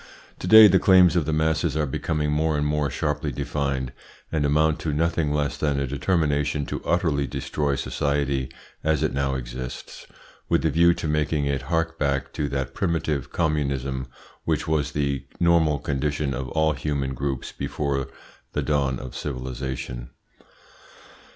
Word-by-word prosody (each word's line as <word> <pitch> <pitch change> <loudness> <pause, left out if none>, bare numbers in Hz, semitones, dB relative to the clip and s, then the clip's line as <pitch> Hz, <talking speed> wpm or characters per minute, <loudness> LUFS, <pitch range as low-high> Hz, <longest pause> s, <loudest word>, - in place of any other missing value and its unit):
To - - -5
day 110 +2 +10
the 95 -2 +4
claims 90 -2 +6
of 80 -4 +1
the - - +1
masses 80 0 +1
are 75 - +1
becoming 75 +2 -1
more 75 0 +1
and 75 - 0
more 75 -1 0
sharply 75 +2 -2
defined, 70 -1 -2 0.4
and 80 -2 0
amount 75 +1 +2
to 80 - -2
nothing 80 0 +1
less 75 -1 0
than 70 -2 0
a 70 - 0
determination 75 0 0
to - - -5
utterly 80 -5 +1
destroy 70 +2 -1
society 70 -1 -1 0.3
as 80 -1 +1
it 80 - 0
now 70 -1 0
exists, 60 0 -7 0.4
with - - +2
a - - +3
view 85 +1 +5
to - - -4
making 75 -1 0
it 70 -2 0
hark 80 -1 0
back 70 -2 -1
to 75 - -2
that 65 -1 -3
primitive 80 -6 -1
communism 70 -5 -1 0.4
which - - -1
was 80 -2 0
the 70 -2 -1
normal 85 -3 +4
condition 70 0 -1
of 65 +1 -4
all 80 -1 +2
human 70 -2 -2
groups 65 0 -3
before 70 -1 -2 0.5
the - - -1
dawn 70 -4 +1
of 65 - -8
civilisation. 65 -2 -5
75 Hz, 155 wpm, -24 LUFS, 70-80 Hz, 0.5 s, day